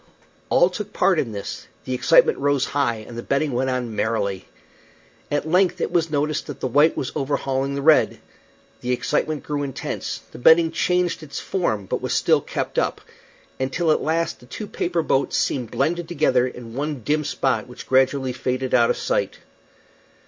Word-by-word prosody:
All 175 +1 +4
took 210 +2 -6
part 180 -3 +3
in 115 - -1
this; 100 -2 -6 0.2
the 130 - -3
excitement 145 +6 +4
rose 140 -1 +2
high 120 -6 -1
and 120 - -9
the 120 - -4
betting 140 +4 0
went 130 +2 0
on 125 -3 -2
merrily. 105 -3 -1 0.8
At 145 +1 -1
length 180 +1 +2
it - - -1
was 170 -2 +1
noticed 150 0 -1
that 145 - -7
the - - -3
white 145 +5 +3
was 130 - -2
overhauling 135 -1 -1
the 140 - -3
red. 160 +1 +4 0.6
The 125 +1 -1
excitement 150 +4 -1
grew 145 -1 -2
intense; 140 -2 -4
the - - -10
betting 160 +5 +6
changed 180 +1 0
its 150 -2 -6
form, 110 - -1
but - - -3
was - - -2
still - - +3
kept - - -2
up, - - -1 0.6
until 145 +5 +1
at - - +2
last 165 +2 -1
the 125 - -17
two 215 - -6
paper 175 -4 -1
boats 135 - +1
seemed 125 -4 -1
blended 170 +1 -1
together 130 -7 +2
in 120 -2 -9
one 145 +1 -3
dim 150 +5 +1
spot 130 -5 -1
which 125 0 -10
gradually 130 0 +2
faded 130 +1 -2
out - - +5
of 485 - +1
sight. - - -1
140 Hz, 180 wpm, -22 LUFS, 125-165 Hz, 0.8 s, betting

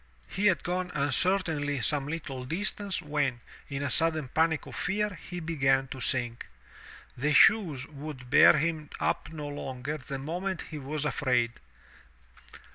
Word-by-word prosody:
He 205 +2 +1
had 185 -4 +2
gone 180 +1 -2
uncertainly 150 -1 +1
some 140 +5 0
Uttle 145 -5 -5
distance, 195 +3 -2
when, 145 -5 -1 0.3
in 140 0 -3
a 140 - -1
sudden 160 -5 +1
panic 160 +2 +1
of - - -9
fear, 210 +3 0 0.2
he 180 0 -4
began 135 -5 +1
to 130 - -7
sink. 120 -2 0 0.7
The 145 +4 0
shoes 160 - +5
would 145 -3 -9
bear 150 - +8
him 155 -1 -1
up - - -1
no 150 -2 -6
longer 145 +1 -5
the 135 +1 -5
moment 175 +6 -3
he 155 - -5
was 145 +2 -3
afraid. 125 -5 +1
150 Hz, 145 wpm, -29 LUFS, 135-165 Hz, 0.7 s, bear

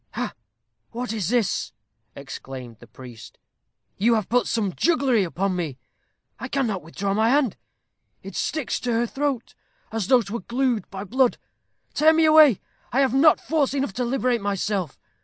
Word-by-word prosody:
"Ha! - - -3 0.6
what 240 0 -4
is 200 -6 -2
this?" 235 -4 0 0.4
exclaimed 125 -4 -9
the 120 - -15
priest. 120 0 -12 0.6
"You 230 +4 +3
have 215 -4 -2
put 245 +1 +2
some 205 -5 -1
jugglery 270 - +2
upon 185 +2 -1
me. 160 -7 -3 0.6
I - - -5
cannot 240 -9 -1
withdraw 195 +5 -3
my 220 +2 +2
hand. 270 -5 +2 0.7
It - - -9
sticks 310 -5 -2
to 245 -1 -2
her 230 +1 +1
throat, 270 -1 -3 0.4
as 220 -4 -2
though 250 -3 +5
'twere 220 +4 -5
glued 245 -2 0
by 195 0 -6
blood. 250 +4 +2 0.6
Tear 315 +2 +5
me 320 0 +4
away. 310 - +7 0.3
I 265 - +2
have 265 -2 +2
not 295 +3 +5
force 290 -4 0
enough 275 -7 -1
to 250 - -2
liberate 245 -1 0
myself. 200 -5 -2
235 Hz, 160 wpm, -24 LUFS, 195-265 Hz, 0.7 s, away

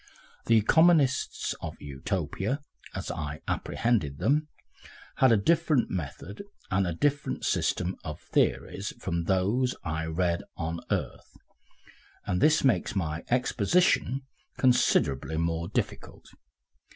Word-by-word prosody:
The 115 - +6
economists 145 +3 +3
of - - -6
Utopia, 90 - -3 0.4
as - - -4
I 75 -1 -5
apprehended 100 - 0
them, 150 - +1 0.7
had 130 -2 +5
a 115 - +5
different 155 +3 +2
method 90 - -5 0.3
and 95 -1 +2
a - - 0
very - - -11
different 145 +4 0
system 90 +1 0
of - - -6
theories 100 +1 -1
from 85 -2 -2
those 105 +8 +1
I 80 0 -2
have 80 0 -5
read 85 -2 +1 0.2
on 85 +1 -3
earth, - - -3 0.9
and 90 0 -1
this 155 0 +4
makes 120 -3 +2
my 85 -4 -2
exposition 130 - +2 0.4
considerably 80 - +2
more 85 0 -1
difficult. - - -4
95 Hz, 120 wpm, -28 LUFS, 85-130 Hz, 0.9 s, The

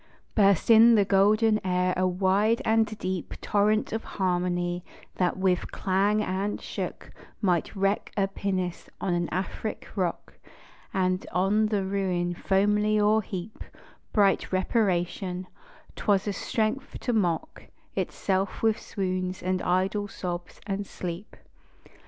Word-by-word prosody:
Burst 200 0 +4
in 230 +1 +8
the 205 -2 +4
golden 215 +3 +3
air 180 0 +1
a 185 0 +2
wide 195 +5 +2
and 220 0 +3
deep 185 -3 -4
Torrent 210 +1 +1
of 225 - -2
harmony, 175 -1 -1 0.3
that 180 -1 +1
with 185 -2 0
clang 200 +3 +1
and 195 +2 -2
shock - - -6 0.3
Might 180 -1 0
wreck 195 +1 0
a 195 -1 +3
pinnace 190 -3 -3
on 185 - -1
an 175 0 0
Afric 190 +4 -4
rock, 180 -3 -3 0.5
And 185 -2 0
on 200 +4 +2
the 205 -3 0
ruin 185 -3 -1
foamily 210 +3 +2
o'erheap 210 -2 0 0.5
Bright 200 -2 +2
reparation: 185 -2 0 0.5
'twas 200 -1 +1
a 205 - 0
strength 225 +7 -2
to 245 - -1
mock 175 -7 -1 0.3
Itself 195 +2 -1
with 220 -1 +3
swoons, 185 -1 -3
and 185 0 0
idle 190 +3 0
sobs, 175 -3 -6
and 200 -1 -3
sleep. 180 +3 -6
195 Hz, 125 wpm, -27 LUFS, 185-210 Hz, 0.5 s, in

